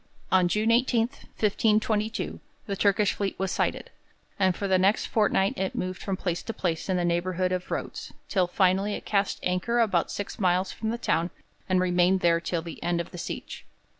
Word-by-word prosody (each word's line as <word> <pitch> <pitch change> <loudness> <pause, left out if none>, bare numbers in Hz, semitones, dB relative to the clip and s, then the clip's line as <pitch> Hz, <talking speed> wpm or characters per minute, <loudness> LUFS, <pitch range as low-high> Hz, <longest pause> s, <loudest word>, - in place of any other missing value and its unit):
On 185 -1 +5
June 215 +5 +1
18, 240 0 +3 0.4
1522, 215 +1 +1 0.3
the 200 -4 -3
Turkish 200 0 +2
fleet 200 -2 -3
was 190 0 -1
sighted, - - -1 0.5
and 190 -2 +3
for 200 - -2
the 190 -1 +3
next 195 +3 +3
fortnight 200 -3 +2
it 190 0 -2
moved 185 0 -3
from 195 -2 -2
place 175 -2 -2
to 225 - -5
place 170 -2 -2
in 185 - +2
the 175 - 0
neighbourhood 180 +1 0
of 180 0 -2
Rhodes, - - -4 0.2
till 185 -3 +2
it 175 - -13
finally 195 +2 +2
cast 200 -1 0
anchor 180 +7 0
about 195 -7 +2
six 205 - -5
miles 185 -1 +2
from 220 - -4
the 235 - -1
town 170 -7 0 0.4
and 185 0 +3
remained 180 +1 +3
there 170 -1 +4
till 170 -1 -2
the 165 -2 -8
end 170 0 0
of 170 - -4
the 175 - -8
siege. - - -6
190 Hz, 195 wpm, -27 LUFS, 180-210 Hz, 0.5 s, On